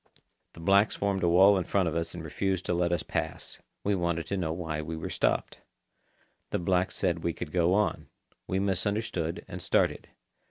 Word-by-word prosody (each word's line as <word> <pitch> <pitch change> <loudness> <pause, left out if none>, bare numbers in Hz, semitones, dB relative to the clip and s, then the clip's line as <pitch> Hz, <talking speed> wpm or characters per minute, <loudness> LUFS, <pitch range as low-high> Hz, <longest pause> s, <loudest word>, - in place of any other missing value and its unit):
The - - -13
blacks 100 +5 +4
formed 100 -1 0
a 85 - +3
wall 95 +3 +6
in - - -1
front 95 +1 +1
of 80 - -2
us 85 +1 -2
and 85 - -6
refused 95 +3 -1
to - - 0
let 85 0 +1
us 85 -3 0
pass. - - -3 0.2
We 100 - +1
wanted 85 -3 0
to 100 - -2
know 85 -4 -1
why 80 -2 -3
we 80 +1 -5
were 80 - -5
stopped. - - 0 0.9
The - - 0
blacks 90 +1 +1
said 85 -3 0
we 85 - 0
could 75 - -6
go 90 +1 +3
on. 105 -5 0 0.4
We 95 - 0
misunderstood, 95 -2 -1
and - - -7
started. - - +1
90 Hz, 195 wpm, -29 LUFS, 85-95 Hz, 0.9 s, wall